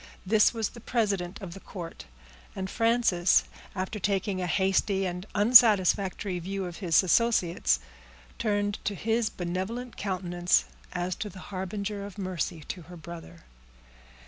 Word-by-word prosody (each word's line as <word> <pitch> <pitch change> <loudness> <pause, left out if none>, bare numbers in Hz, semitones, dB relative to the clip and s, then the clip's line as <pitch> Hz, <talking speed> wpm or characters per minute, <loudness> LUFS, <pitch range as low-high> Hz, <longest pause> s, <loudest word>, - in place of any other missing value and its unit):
This 210 +2 +5
was 225 -3 -2
the 235 - -13
president 200 -6 -1
of 175 -3 -6
the 195 - -9
court; 175 -3 -8 0.5
and 190 0 -4
Frances, 225 -7 +3 0.3
after 190 +3 -3
taking 195 -1 -1
a 180 - -1
hasty 190 +2 +1
and 180 +2 -4
unsatisfactory 205 -4 +5
view 190 +2 -4
of 175 -1 -7
his 180 -2 +3
associates, 175 - +2 0.6
turned 205 -1 0
to 205 - -1
his 225 +3 0
benevolent 190 +7 -4
countenance 175 - +1 0.3
as 180 +1 -2
to 210 - -4
the 190 - -13 0.2
harbinger 200 +2 -3
of 200 -1 -9
mercy 185 -3 -3
to 175 +4 -7
her 175 +2 -12
brother. 160 - -10
190 Hz, 140 wpm, -28 LUFS, 175-210 Hz, 0.6 s, This